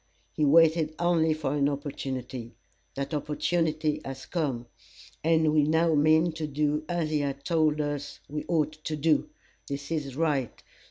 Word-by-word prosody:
He 150 - +1
waited 160 +1 +4
only 170 -2 +2
for 155 -3 -1
an 145 -1 +2
opportunity. 130 -4 -5 0.4
That 140 +3 -4
opportunity 155 0 0
has 135 -1 -7
come, 135 -9 -2 0.6
and 160 -1 +3
we 155 - +5
now 160 +2 +3
mean 155 +3 +4
to 160 -1 -4
do 150 +1 0
as 170 -3 -1
he 150 - +2
has 140 -1 -1
told 155 -2 +2
us 145 -1 -3
we 150 +1 -4
ought 155 -3 +1
to 155 - -1
do. 155 - +2 0.4
This 140 +2 -5
is 145 -5 -2
right. 145 -5 -1
150 Hz, 155 wpm, -28 LUFS, 140-160 Hz, 0.6 s, we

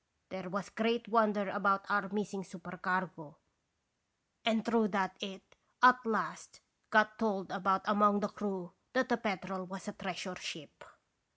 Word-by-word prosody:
There 190 -1 -6
was 195 0 -4
great 230 +1 0
wonder 210 -2 +3
about 195 0 +2
our 205 -1 +1
missing 200 -1 -3
supercargo, 180 -3 -4 1.1
and 225 -2 +2
through 230 -2 +3
that 190 -2 0
it 195 -2 -6 0.4
at 250 0 +8
last 215 -2 -2 0.3
got 215 0 +4
told 195 -5 -1
about 195 0 +1
among 205 0 +4
the 210 - 0
crew 190 -4 -5 0.2
that 260 0 +2
the 240 - +3
Petrel 190 -3 -3
was 190 +2 -9
a - - -3
treasure 185 -1 -5
ship. 155 -4 -8
200 Hz, 145 wpm, -33 LUFS, 190-215 Hz, 1.1 s, at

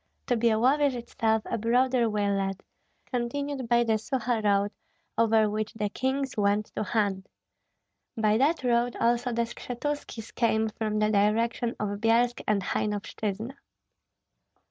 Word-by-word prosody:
To 245 - +1
Byalovyej 250 +5 +3
itself 225 -2 -1
a - - -2
broader 245 +1 +2
way 210 -1 0
led, 195 -1 -2 0.4
continued 260 +1 -3
by 240 0 +4
the 220 -2 +1
Suha 235 -2 -1
road, 200 0 +2 0.4
over 225 -1 +4
which 215 +1 -3
the 210 -2 -1
kings 265 +4 -2
went 205 0 +1
to - - -1
hunt. 200 -3 -1 0.9
By 215 0 +2
that 300 +3 +2
road 240 0 +1
also 240 +1 +1
the 235 0 +1
Skshetuskis 240 -1 -5
came 220 -2 +1
from 215 0 -3
the 215 0 +2
direction 230 +3 +1
of 205 -1 -2
Byelsk 235 +2 +2
and 205 -2 +1
Hainovshyna. 210 +4 -3
230 Hz, 135 wpm, -27 LUFS, 210-245 Hz, 0.9 s, by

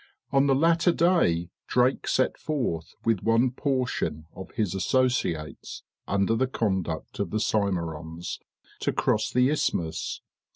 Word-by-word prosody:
On 135 0 +4
the 135 - +4
latter 165 +4 +4
day, 155 - +2 0.2
Drake 125 +1 +2
set 130 - +2
forth 120 - -3
with 115 -4 +2
one 115 +3 +3
portion 125 - -1
of 95 - -8
his 105 -7 0
associates, 95 -7 -1 0.2
under 100 +3 +2
the 130 +3 +1
conduct 95 -11 -2
of 100 -3 -1
the 110 - -1
Symerons, 85 -6 -2 0.4
to - - 0
cross - - +1
the 125 +2 +3
isthmus. 80 - -1
110 Hz, 130 wpm, -26 LUFS, 85-130 Hz, 0.4 s, On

